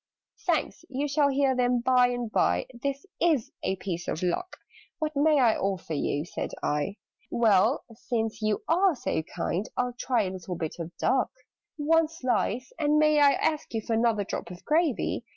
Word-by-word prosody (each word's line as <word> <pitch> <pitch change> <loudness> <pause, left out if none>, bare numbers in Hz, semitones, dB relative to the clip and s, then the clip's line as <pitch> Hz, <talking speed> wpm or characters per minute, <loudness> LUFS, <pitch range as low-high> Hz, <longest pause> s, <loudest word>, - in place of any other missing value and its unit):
"Thanks! - - 0
You 275 +2 -1
shall 285 0 +3
hear 270 -1 +2
them 245 -1 +2
by 250 0 +4
and 245 -2 -3
by - - +2
This 275 +5 -4 0.2
is 315 -9 +2
a 190 - 0
piece 180 -2 -5
of 165 - -3
luck!" 360 - -2 0.4
"What 310 -2 -3
may 300 +1 +4
I 235 -4 +4
offer 190 -4 -2
you?" 145 0 -1
said - - -5
I. 150 +7 -1 0.3
"Well, 225 +2 +3
since 225 -1 -3
you 215 -1 0
are 360 +1 +3
so 240 - -1
kind, 180 +5 -3
I'll 250 0 0
try 240 -2 0
A 185 - -3
little 185 -1 -6
bit 160 -2 -4
of 165 -1 -4
duck. 260 - +2 0.5
"One 320 +2 +3
slice! 255 -4 -1
And 300 -1 +3
may 305 0 +4
I 285 -1 +6
ask 305 -6 -1
you 220 - 0
for 230 - -1
Another 225 -2 +2
drop - - -5
of 180 0 -11
gravy?" 310 -6 +1
245 Hz, 180 wpm, -27 LUFS, 205-290 Hz, 0.5 s, I